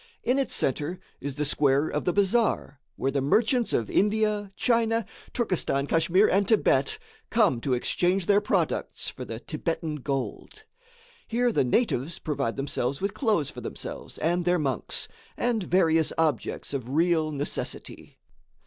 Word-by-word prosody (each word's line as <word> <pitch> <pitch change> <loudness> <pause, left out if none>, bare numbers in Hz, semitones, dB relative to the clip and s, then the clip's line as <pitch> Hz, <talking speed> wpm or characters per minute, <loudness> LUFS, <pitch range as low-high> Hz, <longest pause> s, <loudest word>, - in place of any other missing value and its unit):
In 255 +3 +2
its 275 - 0
centre 150 +6 0 0.2
is 140 -1 -5
the 150 +1 -1
square 140 +1 +2
of 150 - -2
the 180 - +3
bazaar, 200 - +1
where 135 - -1
the 140 0 0
merchants 225 - +2
of 115 - 0
India, 210 0 +1
China, 230 -1 +2 0.3
Turkestan, 180 - 0
Kachmyr 170 +6 +3
and 195 +1 +2
Thibet, 140 - +2 0.3
come 120 -3 +3
to 130 -1 +1
exchange 180 +8 +1
their 205 +2 +4
products 205 - -1
for - - -8
the - - -6
Thibetan 165 -2 -3
gold. 135 - -4 0.6
Here 240 +1 +1
the - - +2
natives 150 - 0
provide 140 -6 -2
themselves 135 -1 -1
with 200 +1 -2
cloths 210 - +1
for - - -9
themselves - - -7
and 175 +2 0
their 180 +1 +2
monks, 135 -7 -2 0.3
and 235 -2 +1
various 165 -3 +3
objects 155 -3 -1
of 130 -3 -4
real 160 +1 +2
necessity. 145 0 -5
165 Hz, 150 wpm, -27 LUFS, 140-210 Hz, 0.6 s, their